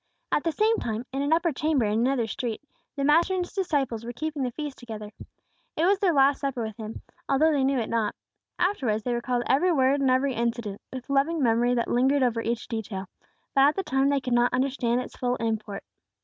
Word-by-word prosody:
At - - +1
the 330 - +1
same 440 +6 +2
time, 225 +2 -3
in 270 - -1
an 285 +2 -1
upper 335 +1 +3
chamber 300 -3 +1
in 210 +1 +1
another 250 0 +1
street, 235 +1 -4 0.3
the 280 - -2
Master 330 +6 +4
and 360 -1 0
His - - -16
disciples 280 - -1
were 240 - -5
keeping 300 +4 -4
the 255 - 0
feast 295 +1 -6
together. 215 -3 -8 0.7
It 320 - +2
was 390 +1 +3
their 390 -4 +3
last 275 -2 +3
supper 270 -4 -2
with 220 -1 -5
Him, 220 -1 -7 0.3
although 305 +4 +4
they 285 -3 +1
knew 270 0 +2
it 230 - -1
not. 225 -3 -1 0.4
Afterwards 255 - 0
they 245 - -1
recalled 240 0 -1
every 350 +8 +3
word 275 -2 +3
and 270 - +3
every 260 +1 +2
incident, 230 -3 -2
with 255 -1 -7
loving 280 +3 +1
memory 240 +1 +3
that 235 - 0
lingered 265 +3 +2
over 235 -2 +1
each 235 0 -2
detail; 200 -4 -5 0.4
but 275 - +4
at 285 +2 +5
the 390 - -1
time 270 -3 +1
they 285 -1 +2
could 250 -2 -2
not 240 +1 +3
understand 255 -2 0
its - - -9
full 245 0 0
import. 220 -4 -3
260 Hz, 220 wpm, -26 LUFS, 235-285 Hz, 0.7 s, at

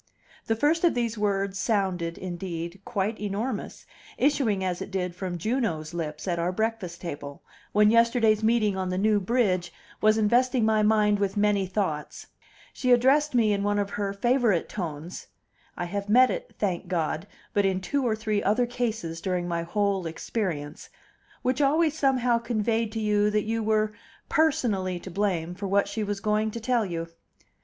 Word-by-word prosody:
The 225 - +2
first 300 +8 +2
of 345 - +4
these 235 -2 -1
words 200 -2 -1
sounded, 190 -6 0
indeed, 175 0 -5
quite 220 -2 -2
enormous, 210 +3 -4 0.3
issuing 260 -9 +2
as 180 -1 -2
it - - -5
did 180 -2 -2
from 180 -1 -4
Juno's 175 -7 -2
lips 155 -1 -4
at 170 -2 0
our 170 +2 0
breakfast 215 -4 -3
table, 145 -4 -7 0.3
when 210 +1 +5
yesterday's 230 -2 +4
meeting 220 -2 +2
on 190 -1 -2
the 185 - -2
New 210 +1 +3
Bridge 185 -5 +1 0.3
was 215 0 +4
investing 240 +2 +3
my 220 -1 +3
mind 210 -1 +3
with 200 0 -1
many 205 -2 +2
thoughts. 180 -6 -3 0.5
She 255 - 0
addressed 270 +4 +4
me 220 -3 +4
in 200 - -1
one 205 0 +1
of 200 -1 -1
her 200 -1 -2
favorite 230 -3 +2
tones 170 -3 -6 0.5
(I 175 - -2
have 200 +3 -4
met 255 +4 +6
it, - - -6
thank 185 -3 -2
God! 165 0 -2 0.3
but 205 - +3
in 190 -1 +1
two 280 +9 -1
or 230 -3 +1
three 215 -1 -1
other 215 +5 +2
cases 225 -9 -3
during 180 -2 -1
my 170 -1 -1
whole 195 +1 0
experience), 160 -3 -4 0.5
which 255 +3 +1
always 305 +2 +3
somehow 255 -5 +2
conveyed 225 -1 -1
to 225 - -2
you 210 -1 +2
that 210 0 +1
you 225 +1 -1
were 215 0 +1 0.4
personally 205 - +1
to 185 - -9
blame 180 -3 -1
for 200 +2 -5
what 200 +1 +2
she 220 - -3
was 205 -1 -3
going 215 +1 +1
to 235 - -6
tell 235 -2 +1
you. 165 -2 -4
205 Hz, 175 wpm, -26 LUFS, 185-230 Hz, 0.5 s, met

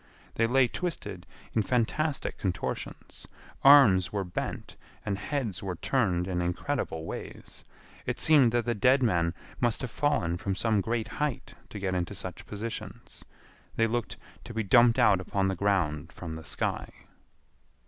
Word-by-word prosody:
They 115 - +2
lay 130 +1 +4
twisted 105 - -5 0.3
in 110 - +2
fantastic 130 +7 -1
contortions. 95 -3 -4 0.4
Arms 110 -11 +7
were 100 -2 -1
bent 90 -2 -5 0.3
and 100 - -1
heads 115 -7 -3
were 95 -2 -4
turned 90 -5 0
in 90 -2 -1
incredible 90 - -2
ways. - - -8 0.4
It - - -2
seemed 145 -7 +5
that 120 0 0
the 120 - +1
dead 130 +5 +3
men 85 -7 +1 0.2
must 120 -2 +1
have 125 -4 -4
fallen 100 - 0
from 95 +2 -2
some 110 0 +1
great 115 +1 -2
height 145 +1 -3 0.2
to - - -8
get 95 -2 -2
into 90 +2 -2
such 95 -2 -7
positions. 110 +2 -7 0.5
They 115 - +3
looked 120 +1 -2 0.3
to 120 - -9
be 110 - 0
dumped 120 +4 +5
out 110 -7 +4
upon 95 +1 0
the 95 - -1
ground 85 -5 0
from 85 -3 -7
the 80 0 -8
sky. - - -2
105 Hz, 155 wpm, -28 LUFS, 90-120 Hz, 0.5 s, Arms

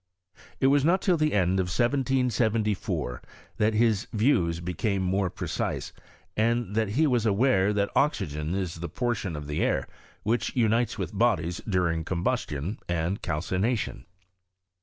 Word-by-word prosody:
It. - - +1
was 140 +1 +4
not 175 +5 +4
till 185 -3 +3
the 155 -1 +1
end 95 -1 +2
of 95 - +1
1774 115 - 0 0.4
that 110 +1 +2
his 110 -3 +2
views 95 - +2
became 95 +3 -1
more 95 +1 +1
precise, - - -3 0.4
and 115 -1 +1
that 110 -1 +1
he 160 - +5
was 120 -6 +2
aware 105 -2 +3
that 100 -1 0
oxygen 80 - 0
is 90 -4 -3
the 85 0 -4
portion 110 -4 -2
of 75 0 -6
the 75 +1 -2
air - - +1 0.4
which, 115 +3 0
unites 115 -1 +2
with - - -4
bodies 85 +2 +1
during 85 -4 +1
combustion, 90 - -2
and 85 +3 -1
calci 85 +3 -2
nation. 115 +1 -1
105 Hz, 145 wpm, -27 LUFS, 85-120 Hz, 0.4 s, he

